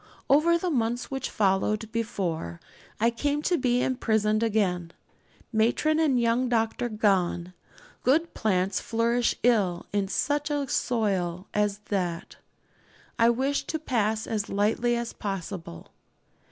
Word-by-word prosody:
Over 330 +4 +5
the 355 +1 -2
months 240 -1 -1
which 270 -1 -3
followed 210 +2 0
before 185 - -3 0.4
I 230 +2 +3
came 290 +5 -1
to 355 - +2
be 250 -4 +1
imprisoned 220 -4 +1
again, 185 -7 0 0.6
matron 240 +8 +2
and 285 -6 +3
young 235 +2 +1
doctor 230 +1 0
gone 185 -5 +1 0.5
good 320 +6 +2
plants 190 -3 0
flourish 235 +1 +1
ill 200 -8 +2
in 200 -1 +1
such 290 +8 0
a 290 -2 -1
soil 190 -9 -1
as 210 -1 +1
that 180 -4 -2 0.8
I 230 0 +6
wish 265 +4 0
to 315 - -2
pass 220 -7 0
as 215 -2 -2
lightly 220 +4 +1
as 235 0 -3
possible. 190 - -6
225 Hz, 125 wpm, -27 LUFS, 200-250 Hz, 0.8 s, I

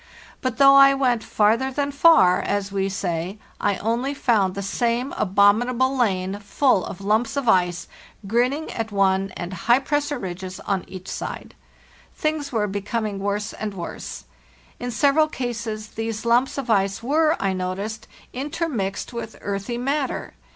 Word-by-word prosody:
But 255 -2 -2
though 275 -1 +7
I 275 0 +7
went 250 -4 +1
'farther 225 +5 +2
than 285 +1 -1
far,' 280 - +5
as 200 -1 -2
we 195 0 0
say, 180 0 -3
[ - - -18
only 230 +7 0
found 210 -9 +2
the 200 - -4
same 240 +5 -1
abominable 235 +7 +3
lane, 195 -5 0
full 205 0 +2
of 190 - -8
lumps 220 +6 +1
of 275 -3 -2
ice, 180 -4 +2 0.4
grinning 250 +9 0
at 225 -1 -4
one, 195 -1 +2
and 175 +1 -5
high 235 +7 +3
pressure 290 +1 -1
ridges 185 -2 -6
on 195 -2 -2
each 185 0 -10
side. - - -6 0.6
Things 305 -2 -2
were 220 -4 +1
becoming 205 +1 -3
worse 205 +2 -2
and 210 -2 -5
worse. 175 -2 -7 0.5
In 245 - -4
several 285 +6 +3
cases 230 -5 -4
these 225 0 -4
lumps 240 +4 +2
of 265 -4 -2
ice 195 0 +1
were, 310 +5 +2
I 195 -1 0
noticed, 195 +4 -4 0.3
in 270 +4 -4
termixed 245 - -3
with 235 -1 -6
earthy 200 +4 -3
matter. 275 +2 -2
220 Hz, 155 wpm, -23 LUFS, 195-260 Hz, 0.6 s, though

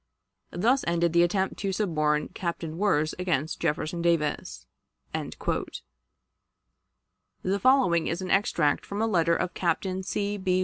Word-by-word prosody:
Thus 240 +9 +2
ended 170 -1 +1
the 170 - +5
attempt 190 +2 +1
to 195 -1 -2
suborn 155 -7 0
Captain 170 -2 -4
Wirz 155 -7 +2
against 160 -4 -1
Jefferson 155 +3 -1
Davis." 165 -3 0 0.5
The - - -4 2.2
following 250 -11 +4
is 170 - -2
an 185 -1 -4
extract 170 -7 +2
from 200 - -5
a 225 - +2
letter 170 -6 +2
of 180 - -2
Captain 185 +2 -1
C. 200 +2 -2
B. 185 -1 +1
175 Hz, 130 wpm, -27 LUFS, 165-195 Hz, 2.2 s, the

